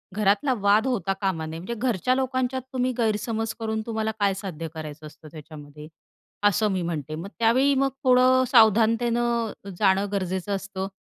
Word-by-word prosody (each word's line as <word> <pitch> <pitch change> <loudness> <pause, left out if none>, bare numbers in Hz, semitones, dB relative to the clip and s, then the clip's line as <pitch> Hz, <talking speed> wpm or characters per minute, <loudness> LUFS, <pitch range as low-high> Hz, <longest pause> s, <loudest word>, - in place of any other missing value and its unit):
घरातला 210 +6 +2
वाद 205 +5 +3
होता 195 -7 0
कामा 185 -5 -1
नये, 160 +1 -6
म्हणजे 190 +7 -5
घरच्या 245 +1 0
लोकांच्यात 260 0 -1
तुम्ही 255 0 0
गैरसमज 225 0 -1
करून 220 -1 -2
तुम्हाला 220 -1 -2
काय 200 -1 +2
साध्य 180 -5 -6
करायचं 155 -1 -8
असतं 155 +1 -15
त्याच्यामध्ये? 150 -1 -11 0.6
असं 205 +1 +3
मी 185 -2 -1
म्हणते 155 -3 -4
मग 170 +5 -6
त्यावेळी 255 +5 +3
मग 270 0 +2
थोडं 255 0 +5
सावधानतेनं 230 0 +3 0.3
जाणं 195 0 +3
गरजेचं 190 0 -2
असतं. 195 -1 -5
210 Hz, 150 wpm, -25 LUFS, 185-235 Hz, 0.6 s, थोडं